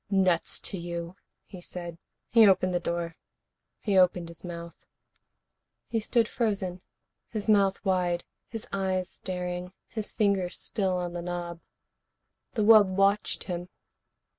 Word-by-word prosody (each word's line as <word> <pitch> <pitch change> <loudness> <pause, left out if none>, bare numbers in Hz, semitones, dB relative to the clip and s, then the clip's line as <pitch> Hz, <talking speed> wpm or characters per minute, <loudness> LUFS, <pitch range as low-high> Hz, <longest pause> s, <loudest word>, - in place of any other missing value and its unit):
"Nuts 185 -4 +2
to 195 - 0
you," 170 0 -5 0.3
he 185 - -11
said. 175 -2 -7 0.3
He 225 -2 +8
opened 185 -1 +4
the 175 - +2
door. 170 -1 -3 0.6
He 200 -3 +3
opened 180 -2 +3
his 170 - -12
mouth. 170 -1 -7 1.1
He 230 - -1
stood 225 +1 +2
frozen, 195 -7 -1 0.5
his 215 -2 -3
mouth 200 -2 +3
wide, 180 -2 +1 0.2
his 225 -2 -5
eyes 190 -2 0
staring, 180 0 -4 0.2
his 215 -2 -4
fingers 195 -4 +1
still 190 -4 0
on 175 -1 -3
the 175 - -4
knob. 175 -1 -4 0.9
The 215 - +1
wub 215 -2 +8
watched 195 +2 +1
him. 175 -1 -5
185 Hz, 135 wpm, -28 LUFS, 175-200 Hz, 1.1 s, He